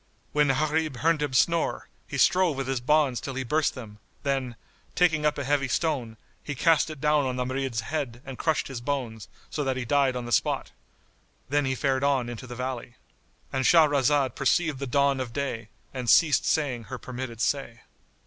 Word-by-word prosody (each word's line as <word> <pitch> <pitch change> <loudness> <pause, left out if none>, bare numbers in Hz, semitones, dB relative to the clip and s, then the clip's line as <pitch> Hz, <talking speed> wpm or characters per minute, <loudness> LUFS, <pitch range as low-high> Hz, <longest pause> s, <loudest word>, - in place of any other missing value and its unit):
When 150 0 +3
Gharib 155 +2 0
heard 160 +3 +2
him 145 -3 -2
snore, 165 +5 +1 0.2
he - - -5
strove 180 -6 +3
with 135 - -2
his 135 -2 -1
bonds 140 -3 +2
till 135 +2 -5
he 135 - -2
burst 150 +5 0
them; 110 -5 -10 0.2
then, 135 -4 -1 0.4
taking 160 -4 +3
up 150 - -1
a 140 - -2
heavy 140 0 +1
stone, 125 -7 -1 0.3
he 145 - -5
cast 160 +2 +3
it 155 -2 -8
down 150 -1 +2
on 130 - -2
the 125 0 -2
Marid's 130 -3 -2
head 130 -2 -4
and 135 -1 -7
crushed 160 -2 0
his 130 -3 -6
bones, 120 -6 -3 0.2
so 150 - -2
that 135 -1 -1
he 130 - -3
died 140 0 +2
on 125 -1 -4
the 120 - -6
spot. - - 0 0.8
Then 145 +1 +1
he 130 0 0
fared 135 0 0
on 135 -4 +1
into 120 +1 -7
the 120 - -7
valley.——And 125 +1 -7
Shahrazad 145 -3 +4
perceived 150 0 +1
the 140 - -4
dawn 140 +1 +2
of 125 -3 -4
day 120 -6 -3 0.2
and 125 -3 -3
ceased 145 -6 +5
saying 125 -4 0
her 130 - -6
permitted 125 -2 -7
say. 120 -3 -1
135 Hz, 190 wpm, -26 LUFS, 125-150 Hz, 0.8 s, ceased